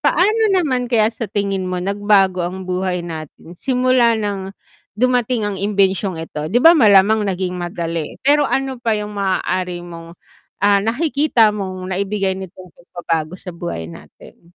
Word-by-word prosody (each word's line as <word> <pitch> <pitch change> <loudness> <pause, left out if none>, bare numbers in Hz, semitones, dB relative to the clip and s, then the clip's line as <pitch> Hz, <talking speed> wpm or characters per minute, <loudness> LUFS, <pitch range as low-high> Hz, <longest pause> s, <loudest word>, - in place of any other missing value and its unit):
Paano 430 +2 +2
naman 260 -9 +1
kaya 220 -3 +3
sa 225 -1 -5
tingin 195 -2 -2
mo 180 0 -3
nagbago 195 -1 +2
ang 185 +1 -6
buhay 180 -1 -2
natin 160 0 -9
simula 255 -3 +2
nang 200 -2 -4 0.4
dumating 250 -1 +1
ang 205 -1 -2
imbensyong 195 -2 0
ito? 155 -2 -5
'Di 230 - -1
ba, 330 - +9
malamang 210 -1 +5
naging 180 -1 -2
madali, 170 -2 -4
pero 290 +1 +4
ano 270 -2 -2
pa 225 -2 +1
yung 210 0 -4
maaari 185 -2 -2
mong, 170 -1 -10 0.5
ah, 200 0 +5
nakikita 245 0 +2
mong 190 -2 -5
naibigay 195 0 -1
nitong 185 -1 -10
pagpabago 165 -1 -4
sa 185 0 -9
buhay 170 - -6
natin? - - -15
195 Hz, 150 wpm, -19 LUFS, 180-225 Hz, 0.5 s, ba